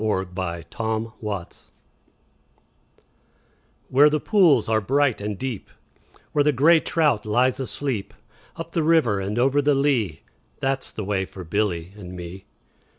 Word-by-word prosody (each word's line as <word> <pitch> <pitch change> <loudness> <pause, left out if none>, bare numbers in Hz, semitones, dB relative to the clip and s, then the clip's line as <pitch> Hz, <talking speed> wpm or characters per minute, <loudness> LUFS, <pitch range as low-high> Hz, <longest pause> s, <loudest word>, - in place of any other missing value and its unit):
A 100 -3 0
Boy's 90 -2 -5
Song 110 -1 -2 2.8
WHERE 145 +3 +6
the 150 0 0
pools 170 - +4
are 110 0 +2
bright 135 +1 +1
and 105 -1 -3
deep, 125 -4 -5 0.6
Where 145 - +3
the 150 - +4
grey 155 +5 +5
trout 150 -9 +1
lies 125 +5 +1
asleep, 130 -5 -3 0.4
Up 165 0 -7
the 165 - 0
river 155 -10 +3
and 100 +3 -3
over 135 +4 +3
the 145 0 +3
lea, 125 - 0 0.4
That 135 0 -1
's - - -8
the 110 - -5
way 95 -1 0
for 95 0 -10
Billy 90 -1 -2
and 90 -3 -9
me. 90 +2 -8
115 Hz, 145 wpm, -23 LUFS, 100-145 Hz, 2.8 s, WHERE